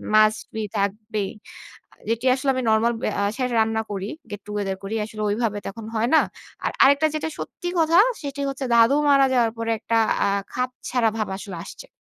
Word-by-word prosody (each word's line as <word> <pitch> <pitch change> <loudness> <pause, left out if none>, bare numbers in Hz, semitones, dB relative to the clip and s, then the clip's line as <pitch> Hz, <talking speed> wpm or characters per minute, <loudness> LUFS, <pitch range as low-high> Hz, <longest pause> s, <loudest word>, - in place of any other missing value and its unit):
Must 215 0 +5
be 220 - -2
থাকবেই। 205 0 -2 0.8
যেটি 230 +2 -1
আসলে 270 +1 -1
আমি 255 - 0
নরমাল 220 +2 +3 0.2
অ্যা 200 - +1
বাসায় 255 -2 0
রান্না 220 0 +1
করি। 195 0 -4 0.2
গেট 205 - -6
টুগেদার 205 -2 -2
করি। 200 +3 -3
আসলে 215 0 -8
ওইভাবে 210 0 0
তো - - -6
এখন 225 0 -9
হয় 225 +2 +1
না। - - +7 0.4
আর - - +1
আরেকটা 280 +3 +5
যেটা 310 +1 -2
সত্যি 350 - -5
কথা, 325 +1 +4 0.2
সেটি 285 -1 -5
হচ্ছে 270 0 -4
দাদু 230 +4 +6
মারা 275 -1 +6
যাওয়ার 235 -3 +3
পরে 230 0 -1
একটা 230 +1 0 0.3
আ - - +2 0.3
খাপছাড়া 250 -2 -1
ভাব 215 - -1
আসলে 195 -3 -7
আসছে। - - -10
225 Hz, 185 wpm, -23 LUFS, 215-260 Hz, 0.8 s, না